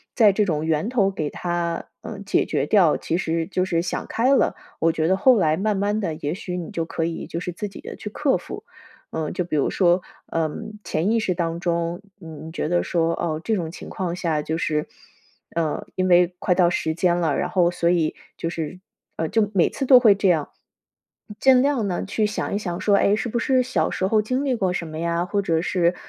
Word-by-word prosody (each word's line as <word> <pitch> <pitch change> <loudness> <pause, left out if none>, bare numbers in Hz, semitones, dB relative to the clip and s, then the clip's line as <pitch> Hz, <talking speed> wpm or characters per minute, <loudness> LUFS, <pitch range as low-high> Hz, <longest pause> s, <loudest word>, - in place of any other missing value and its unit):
在 215 -4 +6
这 205 +1 +1
种 155 -4 -1
源 160 +5 0
头 205 -6 +2
给 155 -6 -3
它 175 0 -3
嗯， 205 -2 -7
解 195 - +2
决 145 -3 0
掉， 175 -2 +4
其 165 - -2
实 165 -2 -1
就 185 0 -1
是 170 -2 0
想 175 - -3
开 255 +4 +2
了， - - +2 0.2
我 165 - +3
觉 160 0 0
得 190 - +3
后 245 +5 +5
来 155 -4 +2
慢 210 +1 0
慢 205 +2 0
地， 170 -6 -2
也 145 +3 -1
许 180 -2 -5
你 170 - -6
就 165 -1 -2
可 165 - -2
以 165 0 -4
就 165 - -4
是 180 - -4
自 200 +4 -5
己 - - -11
的 - - -8
去 210 - -7
克 275 +5 +1
服。 - - -6 0.5
嗯， 155 -2 -2
就 180 - -1
比 165 -3 -2
如 140 - +2
说 180 -1 +3 0.3
嗯， 185 +7 -3
潜 170 +8 0
意 230 - +3
识 185 -4 0
当 170 -1 -2
中， 170 0 -1 0.2
你 160 -4 -9
觉 155 - -2
得 175 0 +2
说， 165 -1 0
哦， 160 -2 -2
这 225 - +1
种 170 -5 -3
情 170 - -9
况 175 -2 -3
下 165 -4 -1
就 160 +2 -2
是 150 -2 -1 0.7
呃， 160 -3 -1
因 185 0 +1
为 180 0 +4
快 180 - +1
到 175 -2 +4
时 160 -2 -1
间 175 0 +2
了， 160 -5 +1
然 - - -1
后 175 -2 +3
所 170 -1 0
以 170 -3 +1 0.2
就 165 - -2
是 165 +1 -5 0.4
嗯， 160 -1 -1
就 210 -2 +1
每 185 -4 +3
次 270 - -3
都 255 -1 +8
会 220 -5 +6
这 195 -1 +2
样， 160 -4 +1 0.9
尽 260 -1 +6
量 275 -7 +1
呢 180 - -2
去 210 +2 0
想 210 - -3
一 200 - +1
想 175 -4 -4
说， 205 -2 +4
哎， 205 - +3
是 235 - -3
不 235 - -1
是 255 +2 +2
小 255 +1 0
时 190 - -1
候 215 +2 +3
经 255 +6 -1
历 265 - +1
过 190 -6 0
什 170 - -3
么 155 0 -7
呀？ 170 +1 0
或 200 +2 -1
者 165 -4 0
是 180 -1 +1
175 Hz, 250 characters per minute, -23 LUFS, 165-205 Hz, 0.9 s, 都